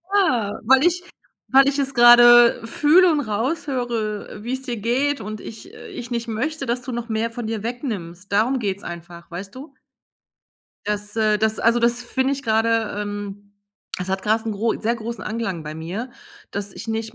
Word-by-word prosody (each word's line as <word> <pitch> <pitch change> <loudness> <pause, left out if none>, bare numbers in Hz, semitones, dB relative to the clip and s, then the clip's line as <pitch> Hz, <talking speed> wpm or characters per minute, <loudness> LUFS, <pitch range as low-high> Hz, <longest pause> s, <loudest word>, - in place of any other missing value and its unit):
Ja, 240 - +1
weil 265 +6 +5
ich 355 +1 +1 0.5
weil 270 +1 +6
ich 280 - -3
es 275 0 -1
grade 240 -1 +7
fühle 330 +8 +5
und 300 - +1
raushöre, 230 -3 -3
wie 245 +2 -3
es 260 0 -4
dir 240 -3 -4
geht, 265 +5 0
und 215 0 -6
ich 225 - -10
äh, - - -11
ich 245 0 -8
nicht 235 0 -2
möchte, 275 +7 -3
dass 245 0 -1
du 255 +1 -6
noch 235 0 -5
mehr 225 +1 -1
von 230 -1 -5
dir 220 -2 -3
wegnimmst. 205 - -5
Darum 235 +6 +2
geht's 200 -3 -3
einfach, 170 0 -9
weißt 195 +4 -7
du? 280 +5 -11 1.1
Das 210 0 -3
äh, 215 -1 +2
das, 220 +1 0
also, 230 +1 +3
das 240 +1 +1
finde 260 +3 0
ich 275 - -4
grade 225 -1 +1
ähm, 205 0 -6 0.5
es 180 - -4
hat 190 0 -2
grade 220 +2 +1
'n - - -1
gro 220 +3 0
'n - - -7
sehr 235 +2 0
großen 230 -2 -6
Anklang 210 -6 -3
bei 150 0 -7
mir, 180 +11 -5 0.4
dass 200 0 -4
ich 225 - -9
nicht 225 0 -3
230 Hz, 195 wpm, -22 LUFS, 210-250 Hz, 1.1 s, grade